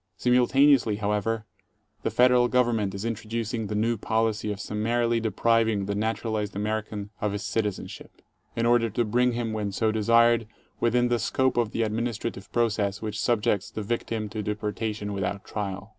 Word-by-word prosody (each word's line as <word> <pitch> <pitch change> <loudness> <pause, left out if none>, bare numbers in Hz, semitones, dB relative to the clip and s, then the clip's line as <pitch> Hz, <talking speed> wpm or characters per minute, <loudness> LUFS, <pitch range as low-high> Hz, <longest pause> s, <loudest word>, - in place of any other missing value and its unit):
Simultaneously, 125 0 +4
however, 105 +1 -1 0.6
the - - -1
Federal 125 0 +4
Government 115 -6 +1
is 100 +3 -5
intro 115 -2 -4
ducing 115 -1 -2
the 105 - -3
new 115 +2 +1
policy 110 0 0
of 100 - -5
summarily 115 +3 0
depriving 110 -1 +1
the 100 - -2
naturalized 110 -1 -2
Amer 105 +2 -1
ican 105 -1 -7
of 105 -1 0
his 105 +2 -4
citizenship, 105 -4 -4 0.3
in 115 - 0
order 120 -1 +3
to 120 +3 0
bring 125 +3 +2
him 115 -2 -2
when 105 -2 -2
so 110 +3 +1
desired, 115 +1 +4 0.3
within 120 +1 +2
the 120 -1 +1
scope 130 +4 +1
of 120 -3 +1
the 115 - -1
administrative 110 -2 -3
process 110 -4 0
which 105 -1 -3
subjects 105 -4 +1
the 110 - -5
victim 115 0 -2
to 110 - -4
deportation 105 0 -3
without 100 0 -3
trial. 100 -1 -5
110 Hz, 165 wpm, -26 LUFS, 105-115 Hz, 0.6 s, Simultaneously